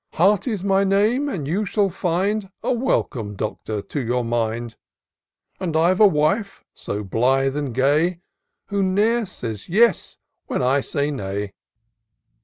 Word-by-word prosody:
Hearty's 200 - +2
my 195 0 +3
name, 215 +9 +2
and 160 - -4
you 190 +8 0
shall 200 -1 0
find 195 +3 -1
A - - +1
welcome. 120 - -1
Doctor, 105 0 -4
to 145 - -4
your 125 -1 -1
mind: 115 0 -2 0.8
And 165 -4 -1
I've 175 +3 +3
a 215 - +8
wife 195 +6 0
so 105 +1 -5
blithe 135 +7 +1
and 145 -3 -2
gay. 150 +8 +1 0.5
Who 200 0 0
ne'er 210 +4 +2
says 115 - -7
yes 215 +1 +2 0.3
when - - -1
I 135 +3 +3
say 145 +2 -1
nay.'' 100 -5 -4
165 Hz, 140 wpm, -22 LUFS, 125-200 Hz, 0.8 s, a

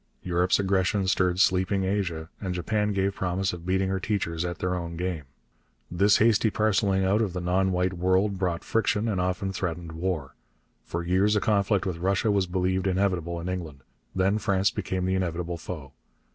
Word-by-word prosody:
Europe's 90 0 +2
aggression 95 0 +1
stirred 90 -1 +1
sleeping 95 +1 +2
Asia, 95 -5 -1
and 95 -3 -3
Japan 105 +4 0
gave 100 0 0
promise 95 0 -1
of 85 0 -8
beating 95 +1 +1
her 95 0 -1
teachers 90 -5 -2
at 85 -2 -3
their 90 +2 -1
own 85 -2 -4
game. 90 -4 -3 0.7
This 100 +4 +4
hasty 110 0 +4
parcelling 100 -2 +1
out 100 +4 +2
of 100 -5 -1
the 90 - -3
non 95 +2 +1
white 90 +1 0
world 95 +2 +1
brought 90 -3 -1
friction 115 -1 +1
and 100 -5 0
often 90 +2 -1
threatened 85 -2 -4
war. 80 -4 -3 0.5
For 85 +1 -3
years 95 +5 +2
a - - +4
conflict 100 -2 +1
with 90 -3 -3
Russia 95 +4 +1
was 100 -2 +1
believed 95 +1 0
inevitable 90 -3 0
in 85 - -5
England. 85 -7 -5 0.3
Then 95 +3 +2
France 95 -1 +2
became 95 -1 -2
the 95 - +1
inevitable 85 -2 -2
foe. 75 -5 -7
95 Hz, 180 wpm, -26 LUFS, 90-100 Hz, 0.7 s, This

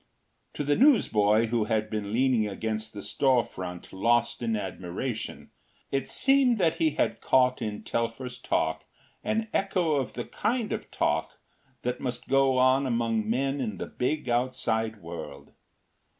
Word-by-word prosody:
To - - -2
the 145 0 +2
newsboy, 110 - +4
who 115 -2 +1
had 110 0 0
been 105 -2 -3
leaning 120 -2 +2
against 110 +1 -3
the 105 - -7
storefront 95 -10 -1
lost 115 +6 +1
in 115 -2 0
admiration, 95 +4 -5 0.4
it 135 -1 -1
seemed 270 -3 +4
that 170 -5 +2
he 160 -2 +1
had - - 0
caught 125 -1 +3
in 105 -2 -4
Telfer’s 125 +2 -3
talk - - 0 0.4
an 220 0 0
echo 185 -4 +1
of 135 -2 -2
the 120 - -4
kind 230 +1 -1
of - - -5
talk - - -1 0.5
that 125 0 -2
must 125 -2 -4
go 135 -1 +3
on 130 +2 +4
among 115 -3 0
men 135 +4 0
in 105 -6 -3
the - - -4
big 140 +3 -2
outside 115 -4 -1
world. 85 - -8
120 Hz, 150 wpm, -27 LUFS, 110-135 Hz, 0.5 s, newsboy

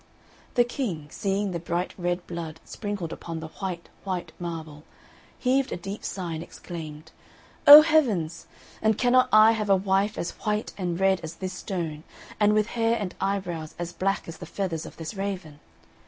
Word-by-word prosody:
The 245 - +6
King, 200 - -4
seeing 200 -1 -1
the 170 - -3
bright 175 +2 -2
red 175 0 -2
blood 165 -2 -6
sprinkled 205 -6 -4
upon 165 -1 -6
the 160 0 -7
white, 180 -3 -4 0.2
white 180 -4 -3
marble, 160 -3 -6 0.5
heaved 265 +1 +1
a - - -2
deep 195 +4 -6
sigh 180 -4 -4
and 160 - -4
exclaimed, 155 -3 -8 0.6
"O 295 +2 +13
heavens! 240 - +1 0.3
and 220 -1 +3
cannot 255 0 +4
I 215 +1 +8
have 215 -2 -1
a 195 - +7
wife 195 +2 +1
as 170 - -2
white 210 +1 -1
and 175 -3 -2
red 190 -1 +3
as 160 +1 -7
this 185 +1 -5
stone, 170 -5 -4 0.4
and 210 0 +5
with 215 -1 +3
hair 230 0 +2
and 195 -4 -3
eyebrows 180 -5 -2
as 175 0 -5
black 195 +3 -1
as 165 0 -7
the - - -8
feathers 175 -5 -3
of - - -12
this 160 +3 -5
raven?" 190 -7 -4
185 Hz, 175 wpm, -26 LUFS, 170-210 Hz, 0.6 s, O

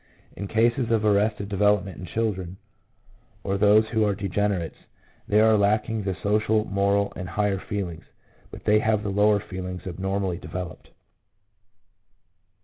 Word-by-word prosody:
In 100 - -5
cases 115 +3 +1
of 110 -2 +1
arrested 105 0 +2
development 105 -1 +1
in 95 - -7
children, 95 -5 -2 0.9
or 95 - -1
those 105 +2 +5
who 110 -2 +1
are 105 -2 +1
degenerates, 100 -3 -2 0.5
there 105 +1 +4
are 110 -1 +5
lacking 105 +2 +1
the 95 -2 -3
social, 105 +1 +2
moral, 100 +1 +1
and 90 -1 -6
all 85 - -10
higher 105 -2 +1
feelings; 95 -5 -5 0.4
but - - -11
they 105 0 +4
have 110 -1 +1
the 100 - -2
lower 105 +1 +3
feelings 90 -2 -7
abnormally 95 0 -2
developed. 90 -1 -7
100 Hz, 140 wpm, -25 LUFS, 95-105 Hz, 0.9 s, those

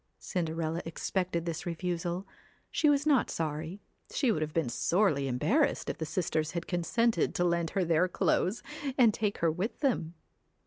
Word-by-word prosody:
Cinderella 165 -2 -2
expected 170 +1 -2
this 170 0 -4
refusal. 175 +1 -2 0.5
She 305 - +3
was 290 0 +3
not 285 -5 +3
sorry; 160 +4 -3 0.3
she 260 -5 +2
would 175 - -1
have 155 0 -1
been 160 -3 0
sorely 150 - +2
embarrassed 215 - +1
if - - -11
the 160 - -2
sisters 160 -2 -1
had 170 -1 -3
consented 225 +7 +1
to 175 - +2
lend 170 -1 +1
her 185 - +3
their 165 +2 +3
clothes, 185 +3 +1 0.3
and 235 -5 +6
take 205 -1 -1
her 165 - +4
with 185 +8 -3
them. 200 - 0
175 Hz, 165 wpm, -30 LUFS, 160-200 Hz, 0.5 s, and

